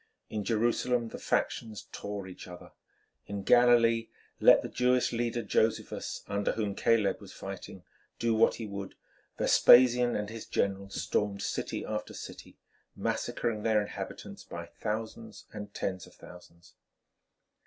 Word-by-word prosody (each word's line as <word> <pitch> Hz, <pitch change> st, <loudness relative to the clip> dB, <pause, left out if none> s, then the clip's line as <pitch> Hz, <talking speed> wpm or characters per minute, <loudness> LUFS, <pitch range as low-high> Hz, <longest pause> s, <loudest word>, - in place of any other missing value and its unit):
In 105 Hz, -1 st, -2 dB
Jerusalem 120 Hz, +2 st, +1 dB
the -, -, -8 dB
factions 110 Hz, -2 st, -2 dB
tore 100 Hz, -1 st, -5 dB
each 95 Hz, 0 st, -10 dB
other. 90 Hz, -1 st, -11 dB, 0.6 s
In 100 Hz, -1 st, -4 dB
Galilee 115 Hz, -1 st, +5 dB, 0.3 s
let -, -, +7 dB
the -, -, -3 dB
Jewish 125 Hz, 0 st, +2 dB
leader 120 Hz, 0 st, -1 dB
Josephus, 110 Hz, +2 st, -1 dB
under 100 Hz, 0 st, 0 dB
whom 105 Hz, -3 st, -2 dB
Caleb 115 Hz, -1 st, +2 dB
was -, -, -11 dB
fighting, -, -, -8 dB, 0.3 s
do 115 Hz, -1 st, +1 dB
what 110 Hz, +1 st, +4 dB
he 115 Hz, -, -6 dB
would, 100 Hz, -2 st, -6 dB, 0.4 s
Vespasian 125 Hz, 0 st, +6 dB
and 105 Hz, 0 st, -3 dB
his 115 Hz, -1 st, -8 dB
generals 100 Hz, 0 st, -1 dB
stormed 100 Hz, -1 st, -1 dB
city -, -, -3 dB
after 105 Hz, 0 st, -4 dB
city, -, -, -10 dB, 0.4 s
massacring 110 Hz, -3 st, -2 dB
their 110 Hz, -1 st, +3 dB
inhabitants 105 Hz, -, -6 dB
by -, -, -7 dB
thousands 110 Hz, 0 st, -5 dB
and 105 Hz, -1 st, -7 dB
tens 95 Hz, -2 st, -3 dB
of -, -, -18 dB
thousands. 85 Hz, -1 st, -15 dB
110 Hz, 135 wpm, -30 LUFS, 100-115 Hz, 0.6 s, let